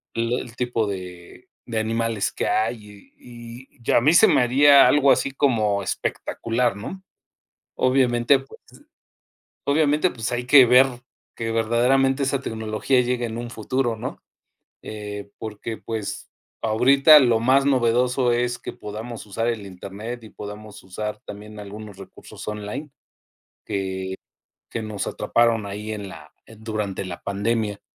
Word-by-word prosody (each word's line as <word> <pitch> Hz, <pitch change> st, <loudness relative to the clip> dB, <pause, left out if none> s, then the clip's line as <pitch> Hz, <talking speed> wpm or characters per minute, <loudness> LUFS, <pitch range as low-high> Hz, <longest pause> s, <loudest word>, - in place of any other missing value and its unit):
l 115 Hz, +1 st, 0 dB
el 115 Hz, -, -10 dB
tipo 120 Hz, -3 st, 0 dB
de 90 Hz, -3 st, -8 dB, 0.2 s
de 115 Hz, -2 st, -1 dB
animales 115 Hz, -1 st, -1 dB
que -, -, -2 dB
hay 105 Hz, -2 st, -3 dB
y 120 Hz, +1 st, -11 dB
y -, -, -30 dB
y -, -, +1 dB
a -, -, +5 dB
mí 150 Hz, +6 st, +4 dB
se 175 Hz, -, +7 dB
me -, -, +4 dB
haría 135 Hz, +2 st, +6 dB
algo 140 Hz, +1 st, +4 dB
así 140 Hz, -, +2 dB
como 110 Hz, -8 st, +1 dB
espectacular, 115 Hz, +1 st, -2 dB
¿no? 190 Hz, -, -8 dB, 0.7 s
Obviamente, 130 Hz, 0 st, +3 dB
pues 135 Hz, 0 st, -14 dB, 1.1 s
obviamente, 150 Hz, +4 st, +2 dB
pues, 120 Hz, 0 st, -4 dB
hay 120 Hz, 0 st, -2 dB
que 135 Hz, 0 st, +8 dB
ver 125 Hz, +2 st, +7 dB, 0.5 s
que 115 Hz, -1 st, -3 dB
verdaderamente 125 Hz, +4 st, +2 dB
esa 135 Hz, 0 st, 0 dB
tecnología 110 Hz, +2 st, 0 dB
llegue, 125 Hz, 0 st, -1 dB
en 115 Hz, 0 st, -5 dB
un 120 Hz, 0 st, -6 dB
futuro, 120 Hz, +1 st, -1 dB
¿no?, 110 Hz, -, -7 dB, 0.6 s
eh, 105 Hz, -1 st, -7 dB
porque, 110 Hz, +1 st, -6 dB
pues, 110 Hz, -3 st, -5 dB, 0.3 s
ahorita 135 Hz, +7 st, +6 dB
lo 120 Hz, -4 st, +3 dB
más 130 Hz, +4 st, +3 dB
novedoso 125 Hz, -1 st, +2 dB
es 120 Hz, +1 st, 0 dB
que 120 Hz, -, -7 dB
podamos 110 Hz, +2 st, -8 dB
usar 115 Hz, +3 st, -2 dB
el 115 Hz, -4 st, -2 dB
internet 100 Hz, +6 st, -8 dB
y 110 Hz, -, -11 dB
podamos 105 Hz, 0 st, -10 dB
usar 105 Hz, +3 st, -5 dB
también 105 Hz, +1 st, -10 dB
algunos 105 Hz, 0 st, -9 dB
recursos 95 Hz, -, -12 dB
online 105 Hz, +8 st, -5 dB, 0.8 s
que 100 Hz, -2 st, -3 dB, 0.8 s
que 115 Hz, -, -4 dB
nos 110 Hz, -2 st, -4 dB
atraparon 115 Hz, -2 st, +1 dB
ahí 105 Hz, +2 st, -6 dB
en 105 Hz, -2 st, -5 dB
la -, -, -13 dB
en 110 Hz, -1 st, -16 dB
durante 105 Hz, -4 st, -3 dB
la 85 Hz, -2 st, -7 dB
pandemia. 105 Hz, +1 st, -1 dB
115 Hz, 145 wpm, -23 LUFS, 105-125 Hz, 1.1 s, que